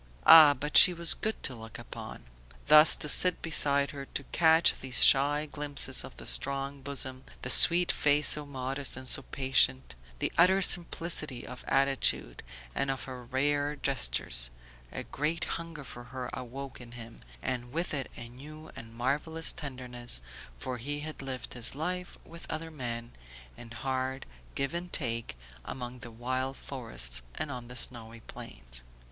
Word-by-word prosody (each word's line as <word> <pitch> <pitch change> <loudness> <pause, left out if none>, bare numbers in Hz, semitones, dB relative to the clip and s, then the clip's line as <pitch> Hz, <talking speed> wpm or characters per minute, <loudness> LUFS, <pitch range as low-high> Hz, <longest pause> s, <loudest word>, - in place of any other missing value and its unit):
Ah, 155 -3 +9
but 150 +3 +2
she 180 - +9
was 170 -1 +4
good 220 0 -4
to 130 - -2
look 115 -2 -10
upon! - - -10 0.4
Thus 155 +1 +7
to - - -1
sit 180 +4 +4
beside 140 -3 +3
her, 140 -2 -9
to - - -2
catch 160 0 +3
these 130 -2 +1
shy 145 +2 +4
glimpses 145 -1 -2
of - - -12
the - - -11
strong 135 - -1
bosom, 130 -1 -5 0.2
the - - 0
sweet 175 0 +6
face 150 0 +3
so 150 - +3
modest 135 0 -5
and 130 0 -9
so 125 - +6
patient, 65 - 0 0.2
the - - -3
utter 185 +3 +5
simplicity 165 -7 +2
of 125 - -9
attitude 135 - +1 0.3
and 135 - -2
of 135 -1 -3
her 130 -2 -9
rare 145 +3 -1
gestures; - - 0 0.4
a - - -6
great 155 +4 -3
hunger 165 -3 -6
for 120 -2 -10
her 125 0 -7
awoke 130 +2 -8
in 120 -1 -13
him, 115 -1 -11 0.3
and 120 -1 -4
with 165 +4 -3
it 140 -3 -4
a 115 - -8
new 150 +6 -13
and 115 0 -11
marvellous 150 +7 0
tenderness, 125 - -3 0.4
for 125 - -6
he 145 +5 -5
had 155 -1 -7
lived 130 -1 -7
his 125 +1 -1
life 180 +4 -5
with 170 +1 -13
other 160 +1 -5
men, 120 -5 -6 0.4
in 120 -1 -12
hard 130 +1 -4 0.3
give 140 +3 -2
and 175 +1 -5
take, 115 - -4 0.3
among 125 - -8
the 120 - -9
wild 130 +3 -4
forests 110 - -2
and 145 - -5
on 125 -3 -8
the 125 - -11
snowy 115 -2 -1
plains. - - -11
135 Hz, 165 wpm, -29 LUFS, 120-150 Hz, 0.4 s, Ah